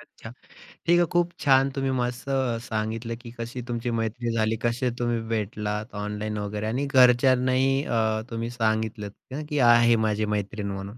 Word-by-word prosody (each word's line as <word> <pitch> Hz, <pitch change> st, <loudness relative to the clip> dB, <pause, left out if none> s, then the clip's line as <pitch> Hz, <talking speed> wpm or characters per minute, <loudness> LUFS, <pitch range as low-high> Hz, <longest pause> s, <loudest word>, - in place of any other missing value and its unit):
अच्छा. 110 Hz, -, -13 dB, 0.6 s
ठीक 175 Hz, +1 st, +5 dB
आहे, 175 Hz, -, +4 dB
खूप 175 Hz, 0 st, +2 dB
छान 135 Hz, -1 st, +4 dB
तुम्ही 135 Hz, -1 st, 0 dB
मस्त 125 Hz, 0 st, -2 dB
अ, 130 Hz, -4 st, 0 dB
सांगितलं 115 Hz, +1 st, -3 dB
की 120 Hz, -, -10 dB
कशी 120 Hz, +2 st, -5 dB
तुमची 120 Hz, 0 st, -2 dB
मैत्री 115 Hz, +2 st, -2 dB
झाली? 110 Hz, 0 st, +1 dB
कसे 120 Hz, +2 st, 0 dB
तुम्ही 120 Hz, -1 st, 0 dB
भेटलात 105 Hz, 0 st, -3 dB
ऑनलाइन 105 Hz, +1 st, -4 dB
वगैरे? 105 Hz, +1 st, -3 dB
आणि 130 Hz, +6 st, -1 dB
घरच्यांनाही 130 Hz, +1 st, +4 dB
अ, 110 Hz, -3 st, 0 dB
तुम्ही 115 Hz, 0 st, -3 dB
सांगितलंत 110 Hz, -2 st, -1 dB, 0.2 s
ना 140 Hz, +3 st, -4 dB
की 150 Hz, -1 st, -1 dB
आहे 120 Hz, 0 st, +5 dB
माझी 105 Hz, 0 st, 0 dB
मैत्रीण 100 Hz, 0 st, -3 dB
म्हणून. 100 Hz, +4 st, -7 dB
115 Hz, 165 wpm, -25 LUFS, 110-130 Hz, 0.6 s, ठीक